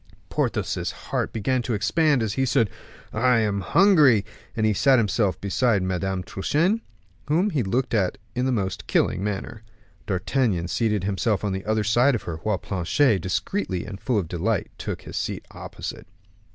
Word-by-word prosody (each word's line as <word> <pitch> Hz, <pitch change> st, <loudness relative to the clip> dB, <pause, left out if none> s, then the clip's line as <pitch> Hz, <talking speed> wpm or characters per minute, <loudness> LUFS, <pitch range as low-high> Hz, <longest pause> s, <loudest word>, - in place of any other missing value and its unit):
Porthos's -, -, -1 dB, 0.2 s
heart -, -, 0 dB
began 125 Hz, +4 st, 0 dB
to 120 Hz, -2 st, -2 dB
expand 150 Hz, +4 st, +2 dB
as 105 Hz, -2 st, -1 dB
he 135 Hz, -, 0 dB
said, 115 Hz, -5 st, +2 dB, 0.4 s
"I 125 Hz, +2 st, +3 dB
am 105 Hz, -3 st, +1 dB
hungry," 145 Hz, -, +5 dB, 0.3 s
and 110 Hz, -, +2 dB
he 110 Hz, -, +3 dB
sat 135 Hz, +6 st, +4 dB
himself 105 Hz, -5 st, +1 dB
beside 100 Hz, 0 st, +1 dB
Madame 95 Hz, 0 st, -2 dB
Truchen, 170 Hz, -, 0 dB, 0.5 s
whom 175 Hz, +8 st, +2 dB
he 150 Hz, -6 st, +1 dB
looked 120 Hz, +5 st, -1 dB
at 100 Hz, -2 st, +1 dB, 0.2 s
in 125 Hz, +1 st, 0 dB
the -, -, +1 dB
most 95 Hz, -6 st, -2 dB
killing 95 Hz, -, +1 dB
manner. 105 Hz, +2 st, -4 dB, 0.5 s
D'Artagnan 95 Hz, -2 st, 0 dB
seated 105 Hz, +1 st, 0 dB
himself 100 Hz, +2 st, 0 dB
on 105 Hz, -, 0 dB
the 95 Hz, +1 st, -4 dB
other 110 Hz, 0 st, +1 dB
side 120 Hz, +5 st, +3 dB
of 110 Hz, -, -4 dB
her, 85 Hz, -2 st, -5 dB
while 105 Hz, +5 st, -1 dB
Planchet, 100 Hz, -, +1 dB
discreetly 95 Hz, -, -2 dB
and 100 Hz, -2 st, -8 dB
full 125 Hz, -5 st, 0 dB
of 95 Hz, -5 st, -1 dB
delight, 85 Hz, 0 st, -1 dB
took -, -, -5 dB
his -, -, -7 dB
seat -, -, -3 dB
opposite. -, -, -7 dB
110 Hz, 170 wpm, -24 LUFS, 95-130 Hz, 0.5 s, hungry